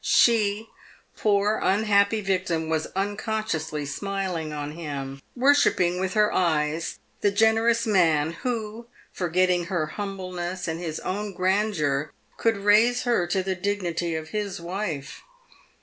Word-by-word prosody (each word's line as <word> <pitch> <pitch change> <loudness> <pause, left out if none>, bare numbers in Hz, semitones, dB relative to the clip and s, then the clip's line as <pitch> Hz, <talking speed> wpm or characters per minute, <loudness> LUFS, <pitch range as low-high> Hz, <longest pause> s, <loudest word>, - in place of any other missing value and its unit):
She, 220 -2 +3 0.5
poor 205 0 +2
unhappy 200 +1 +3
victim, 185 -5 -1
was 160 -1 0
unconsciously 200 -6 -2
smiling 180 0 -3
on 145 -1 -4
him, 140 -4 -6
worshipping 245 -10 +3
with 190 +2 -2
her 210 0 +3
eyes 160 -2 0 0.2
the 205 - +3
generous 225 +3 +3
man 165 -7 +3
who, 230 -2 -3 0.3
forgetting 180 0 +1
her 170 -3 -1
humbleness 185 -1 -5
and 165 0 -3
his 160 -3 -4
own 205 +2 -3
grandeur, 180 -7 0 0.3
could 225 -2 +1
raise 215 +5 +4
her 235 -8 +1
to 185 +2 0
the 190 0 -1
dignity 180 -3 -2
of 160 0 -5
his 205 -4 -3
wife. 170 -5 -4
190 Hz, 125 wpm, -25 LUFS, 165-210 Hz, 0.5 s, raise